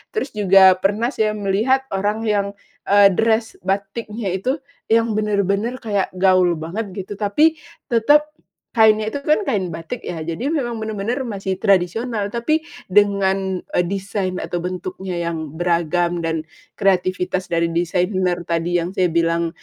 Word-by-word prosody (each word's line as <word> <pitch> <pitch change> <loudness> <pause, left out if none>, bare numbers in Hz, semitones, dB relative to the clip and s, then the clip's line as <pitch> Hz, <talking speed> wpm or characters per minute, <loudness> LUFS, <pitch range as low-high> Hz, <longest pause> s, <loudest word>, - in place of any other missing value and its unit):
Terus 435 -10 -2
juga 190 -2 +5
pernah 210 +6 0
saya 215 -5 0
melihat 215 +7 +1
orang 205 +3 -1
yang, 205 -2 +1 0.4
eee, 200 0 +6
dress 225 +3 0
batiknya 200 +1 -2
itu 255 +8 0 0.3
yang 230 0 +3
bener-bener 205 +2 0
kayak 200 -4 -1
gaul 185 -2 +3
banget 185 +5 -5
gitu, 195 +1 -6
tapi 300 +11 +2 0.3
tetep 295 +7 +4 0.5
kainnya 215 -1 +5
itu 280 +4 -6
kan 305 +6 +3
kain 200 - -1
batik 165 +9 -7
ya, 165 -2 -5
jadi 170 - -3
memang 240 -7 -2
bener-bener 220 +4 -3
masih 195 -4 -3
tradisional. 205 +3 +1
Tapi 240 +9 0 0.2
dengan, 195 -1 +2 0.2
eee, - - +3
desain 195 -1 -3
atau 175 -1 -3
bentuknya 185 +1 -5
yang 165 -3 -3
beragam 175 0 0
dan 160 -1 -2 0.3
kreativitas 185 -1 0
dari 170 0 0
desainer 180 +1 0
tadi 170 +1 0
yang 175 +2 -3
saya 185 -2 +2
bilang, 170 0 +1
195 Hz, 140 wpm, -20 LUFS, 180-220 Hz, 0.5 s, eee